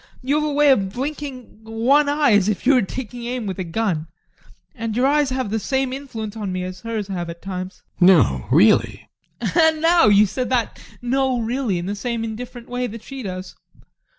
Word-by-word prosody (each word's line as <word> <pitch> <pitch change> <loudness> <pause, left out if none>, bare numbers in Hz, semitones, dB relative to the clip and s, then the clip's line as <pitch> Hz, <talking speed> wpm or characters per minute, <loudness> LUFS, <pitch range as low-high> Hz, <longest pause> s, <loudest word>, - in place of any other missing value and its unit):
You 285 +4 +1
have - - -1
a - - -2
way 290 0 +5
of 195 -7 +2
blinking 270 -2 -6
one 245 +7 +2
eye 290 -2 +3
as 205 -1 +4
if 210 - -3
you 280 - +5
were 255 - +4
taking 240 +3 -6
aim 245 -1 -3
with 190 -2 -4
a - - -1
gun, 170 -3 -2 0.7
and 225 -4 -4
your 250 - +3
eyes 290 0 +3
have 255 -5 -2
the 220 - 0
same 265 +3 -1
influence 230 -6 -6
on 205 -4 -4
me 185 0 -3
as 185 0 -7
hers 225 -3 -4
have 175 -3 -4
at 170 0 -8
times. 185 0 -6 0.2
GUSTAV. 180 - +6
No, 70 - +4
really? 180 - +3 0.3
ADOLPH. - - -2
And 320 -2 +4
now 335 -3 +4
you 205 0 +6
said 250 +6 -3
that 245 -3 -1 0.2
"no, 260 +1 +1
really" 235 -3 -1
in 175 - -4
the 200 - -2
same 230 +2 -3
indifferent 235 +2 -7
way 245 0 -2
that 220 0 -9
she 270 +2 -8
does. 185 -3 -6
230 Hz, 210 wpm, -21 LUFS, 195-265 Hz, 0.7 s, GUSTAV